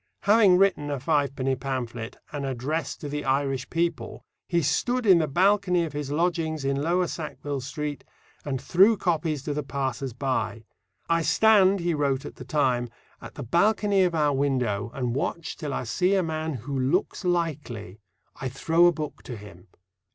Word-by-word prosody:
Having 205 -3 +5
written 185 -6 +2
a 140 -2 -2
fivepenny 135 -2 0
pamphlet, 125 -3 -5
An 145 -2 -4
Address 135 +3 -3
to 150 - -7
the 145 +1 -3
Irish 135 -1 0
People, 170 0 -2 0.2
he 170 -2 +1
stood 245 - 0
in 185 -4 +7
the 155 - +1
balcony 185 +2 +3
of 160 -3 -5
his 145 -1 -4
lodgings 160 -1 -1
in 140 0 0
Lower 175 +4 +1
Sackville 145 -4 -5
Street, 150 +2 -5 0.4
and 135 -3 -3
threw 195 - +4
copies 160 -5 -1
to 145 - -2
the 150 - -2
passers 135 -2 -3
by. 115 -3 -2 0.4
"I 165 0 +2
stand," 200 0 +4
he 170 0 0
wrote 140 -3 0
at - - -9
the - - -9
time, 125 -5 +1 0.3
"at - - -10
the - - -6
balcony 200 - +2
of 175 -2 +1
our 150 -2 +2
window, 125 -8 0
and 125 -3 -1
watch 150 +4 -3
till 150 -4 -5
I - - -2
see 180 - +1
a 190 - +2
man 160 -1 -3
who 130 +4 -5
looks 145 +11 0
likely; 145 - -2 0.4
I 130 - -4
throw 165 +6 +3
a - - +5
book 155 -2 -6
to 120 - -6
him." 100 -3 -13
150 Hz, 175 wpm, -26 LUFS, 135-175 Hz, 0.4 s, in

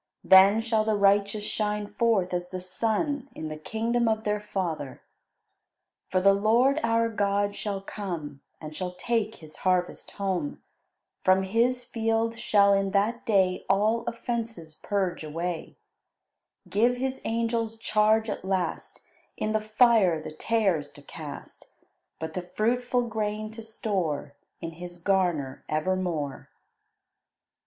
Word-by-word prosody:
Then 195 +3 +7
shall 225 -1 +1
the 215 0 +1
righteous 200 +1 +3
shine 210 0 -1
forth 205 -3 +1
as 175 0 -2
the 185 - -5
sun 225 - -1
in 155 - -5
the 155 - -5
kingdom 230 +8 -1
of 220 -1 +1
their 210 -1 0
Father." 175 -9 -4 1.1
"For 185 - +2
the 195 +1 +5
Lord 235 +8 +3
our 230 0 +2
God 205 -2 0
shall 200 -2 -3
come, 170 -9 -6 0.2
And 155 -1 -8
shall 180 +1 -3
take 220 +4 -1
His 155 -1 -13
harvest 180 -1 0
home; 185 -7 -3 0.6
From 185 +1 +4
His 240 +5 +1
field 225 0 -1
shall 200 -2 +4
in 195 0 +2
that 215 +4 0
day 190 -4 +2
All 215 +4 +2
offences 230 -8 -4
purge 190 -5 -1
away; 165 +2 -4 0.9
"Give 240 +4 +2
His 265 +1 -2
angels 230 0 -1
charge 220 0 +2
at 210 - -4
last 190 -3 -3 0.3
In 215 - -1
the 215 0 +1
fire 215 -6 +4
the 155 - -7
tares 185 -4 0
to 145 - -13
cast, 150 0 -10 0.5
But 160 0 -5
the 180 - -2
fruitful 245 +7 0
grain 215 -2 -3
to 225 +1 -8
store 190 -10 -2 0.3
In 165 - -4
His 175 +1 -9
garner 175 -7 0
evermore." 155 -3 -2
205 Hz, 135 wpm, -27 LUFS, 180-225 Hz, 1.1 s, Then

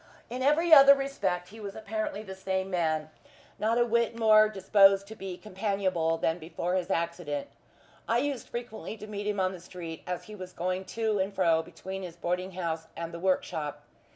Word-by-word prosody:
In 250 +1 -4
every 315 +5 +4
other 280 -1 +10
respect 195 -11 -2
he 220 +3 -12
was 200 -2 -7
apparently 215 -1 -3
the 190 -3 -7
same; 190 0 -2 0.9
not 225 +2 +2
a 240 - +4
whit 235 0 +1
more 215 -1 +6
disposed 195 -1 +5
to 220 - -8
be 190 -3 -6
companionable 190 -5 -1
than 165 +1 0
before 175 +2 -3
his 185 -2 -1
accident. 165 -4 -2 0.6
I 230 - +3
used 270 -2 -2
frequently 230 -4 -6
to 210 - -8
meet 205 -1 -5
him 205 -1 -1
on 185 0 +2
the 185 - -8
street, 170 -2 -8
as 180 -1 -3
he 215 - -11
was 185 -3 -8
going 185 +2 -2
to 220 -2 +1
and 190 +1 0
fro 170 -4 +3
between 190 +3 -7
his 175 -3 -7
boarding 180 +2 -2
house 165 -3 -3
and 165 0 -5
the 170 - -6
work 185 +1 +2
shop. 150 -2 -5
190 Hz, 190 wpm, -29 LUFS, 180-220 Hz, 0.9 s, other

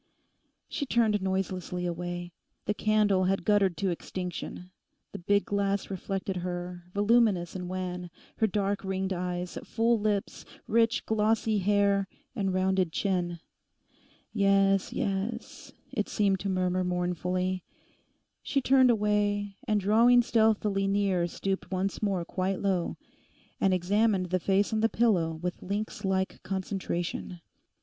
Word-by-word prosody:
She 285 - -3
turned 220 -4 +2
noiselessly 185 -1 -2
away. 175 0 -4 0.3
The 210 - +1
candle 210 -3 +2
had 195 +1 0
guttered 200 -5 +3
to 190 +2 0
extinction. 180 +1 -6 0.4
The - - -7
big 200 +3 +2
glass 200 -1 -1
reflected 195 0 -3
her, 175 0 -5
voluminous 205 -4 +2
and 180 -1 -5
wan, 180 -1 -4 0.3
her 220 - +3
dark 200 0 -1
ringed 190 0 -1
eyes, 180 0 -3
full 230 0 +1
lips, 205 -1 -1 0.2
rich, 230 +1 +2
glossy 220 0 +1
hair, 200 0 +2 0.3
and 195 -4 0
rounded 185 -2 +1
chin. 175 -2 -1 0.9
'Yes, 195 -2 +3
yes,' 205 +4 -3 0.2
it - - -2
seemed 200 -3 +1
to 195 - -3
murmur 185 -1 +1
mournfully. 180 +1 -1 0.8
She 280 - 0
turned 260 -1 +5
away, 205 -2 +1
and 210 -1 +2
drawing 230 +5 +5
stealthily 215 -4 +2
near 195 -3 +1
stooped 190 +2 -3
once 190 +1 -2
more 195 -5 0
quite 185 +2 -2
low, 190 -4 0 0.6
and 195 - +3
examined 190 +1 +1
the 185 - +2
face 200 +4 +1
on 220 - +1
the 225 +1 +3
pillow 190 -10 +2
with 180 -1 -3
lynx 205 +2 -4
like 190 -1 -1
concentration. 185 -2 -3
195 Hz, 130 wpm, -29 LUFS, 180-210 Hz, 0.9 s, turned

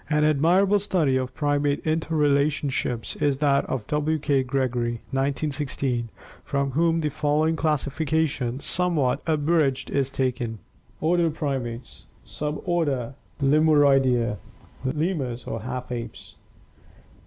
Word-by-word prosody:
An 150 -1 +2
admirable 175 +7 +4
study 180 -9 +1
of 130 0 -2
primate 145 -1 0
interrelationships 145 -5 0
is 140 -2 +2
that 140 -1 +2
of 125 -5 -3
W. 150 +1 0
K. 140 -2 +1
Gregory 125 -2 -1 0.2
(1916), 135 -3 -1 0.3
from 140 -1 -1
whom 165 +3 +2
the 150 - 0
following 150 +3 +1
classification, 150 -3 0
somewhat 165 -6 +1
abridged, 150 -3 +1
is 135 -1 +1
taken: 125 -4 -2 0.4
Order 170 +1 +2
Primates 130 -6 -4 0.2
Suborder 150 -4 -2 0.3
Lemuroidea 135 -6 +4 0.5
(lemurs 140 -4 -2
or 115 - -4
"half 125 0 -5
apes"). 120 -1 -6
145 Hz, 105 wpm, -25 LUFS, 130-155 Hz, 0.5 s, admirable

